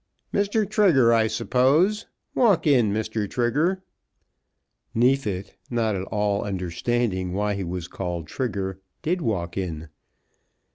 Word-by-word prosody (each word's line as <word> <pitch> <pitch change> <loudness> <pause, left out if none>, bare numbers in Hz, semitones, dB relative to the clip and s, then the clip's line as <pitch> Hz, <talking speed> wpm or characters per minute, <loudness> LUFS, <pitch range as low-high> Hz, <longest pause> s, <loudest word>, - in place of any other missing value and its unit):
"Mr. 205 +1 +1
Trigger, 175 - +4
I 110 -1 +4
suppose; 140 - +2 0.3
walk 220 -9 +3
in, 125 -8 +4
Mr. 110 -1 -2
Trigger." 150 +11 0 1.1
Neefit, 115 -6 +1
not 115 -3 0
at 95 0 -3
all 105 -1 0
understanding 95 +1 -1
why 105 +2 0
he 100 -1 -3
was 90 -1 -4
called 90 -3 -4
Trigger, 95 - -3 0.2
did 175 +3 0
walk 90 - -2
in. 80 -4 -5
110 Hz, 115 wpm, -24 LUFS, 95-135 Hz, 1.1 s, Trigger